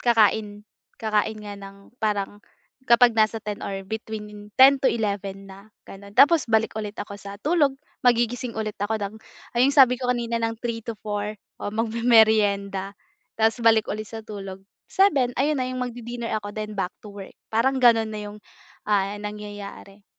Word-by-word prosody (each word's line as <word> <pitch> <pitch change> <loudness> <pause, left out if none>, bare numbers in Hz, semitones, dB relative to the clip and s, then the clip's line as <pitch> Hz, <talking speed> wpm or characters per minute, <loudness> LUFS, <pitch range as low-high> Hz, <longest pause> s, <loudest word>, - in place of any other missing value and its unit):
kakain, 215 -3 +2 0.3
kakain 215 0 0
nga 205 -1 -7
ng 195 0 -11 0.2
parang 205 -2 -1 0.5
kapag 235 0 +6
nasa 220 0 +2
10 205 -1 -5
or 195 -1 -4
between 210 -1 -7
10 270 +1 +8
to 265 - +2
11 200 -3 -3
na 195 +3 -14 0.2
ganon 200 +1 -11
tapos 300 -1 +6
balik 220 0 +2
ulit 210 -1 -5
ako 200 -1 -6
sa 200 0 -9
tulog 295 -4 +2 0.3
magigising 240 0 +2
ulit 215 -1 -3
ako 205 +2 0
ng, 200 +1 -4 0.4
ay 250 - +6
yung 280 - 0
sabi 255 -3 +6
ko 250 - -2
kanina 235 -1 -2
ng 225 0 -1
3 230 -1 -3
to 230 -2 -5
4 210 0 -3 0.3
o - - -3
magmemerienda 215 -4 +2 0.4
tapos 225 +2 +2
balik 225 -1 +5
ulit 215 +1 -4
sa 225 -1 -7
tulog 195 -3 -8 0.3
7 290 -11 +3
ayun 295 +1 +2
na 255 - 0
'yong 255 0 -4
mag-didinner 240 -1 -5
ako 205 0 -7
then 215 0 -6
back 185 -2 -2
to 210 - -11
work 200 -1 -10
parang 260 +4 +1
ganoon 225 -2 +5
na 215 - -5
iyong 205 +1 -10 0.5
ah 205 -1 +1
nangyayari. 205 -1 -8
215 Hz, 170 wpm, -24 LUFS, 205-235 Hz, 0.5 s, 10